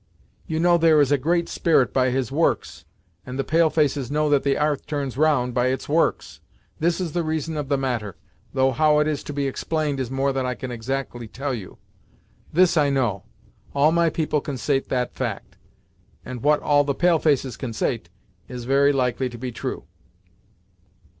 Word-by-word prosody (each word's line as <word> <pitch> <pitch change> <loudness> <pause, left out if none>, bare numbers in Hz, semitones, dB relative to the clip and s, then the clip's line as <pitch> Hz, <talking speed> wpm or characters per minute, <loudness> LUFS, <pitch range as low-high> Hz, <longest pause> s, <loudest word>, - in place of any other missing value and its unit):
You 160 0 -2
know 175 0 +4
there 160 -2 +5
is 145 -1 +3
a 145 - +4
Great 170 +5 +1
Spirit 160 -6 +2
by 130 -1 +3
his 125 -1 -1
works, 160 +4 -1 0.4
and 130 +3 -7
the 135 - 0
pale 160 +3 +3
faces 145 -5 0
know 150 0 +1
that 145 -2 +4
the 140 -1 +1
'arth 150 -1 -1
turns 145 -4 -3
round 135 -4 +2
by 125 +1 +1
its 130 +1 -2
works. 160 +3 0 0.4
This 170 +3 +1
is 175 -4 -2
the 175 - -1
reason 160 0 -2
of 145 -2 -4
the 140 - +2
matter, 120 -7 -3 0.4
though 130 0 +2
how 150 +3 +3
it 150 0 +2
is 150 -2 -1
to - - -5
be 145 -1 -2
explained 145 +1 -2
is 130 -3 -2
more 135 +1 0
than 135 -1 -1
I 125 0 -2
can 130 +1 -6
exactly 120 0 -4
tell 135 +5 -4
you. 105 -6 -7 0.7
This 175 +1 +4
I 145 -2 +4
know; 120 -8 0 0.5
all 145 +2 +4
my 170 0 +3
people 155 -2 -1
consait 135 0 -2
that 125 -2 -1
fact, - - -5 0.7
and 125 -2 -6
what 150 +1 +3
all 145 -1 +4
the 140 -1 -1
pale 175 0 +3
faces 135 -6 +1
consait, 115 -5 -3 0.4
is 125 -1 -7
very 140 +2 +4
likely 130 -1 0
to 120 - -9
be 125 +1 -5
true." 115 - -5
140 Hz, 190 wpm, -23 LUFS, 130-155 Hz, 0.7 s, there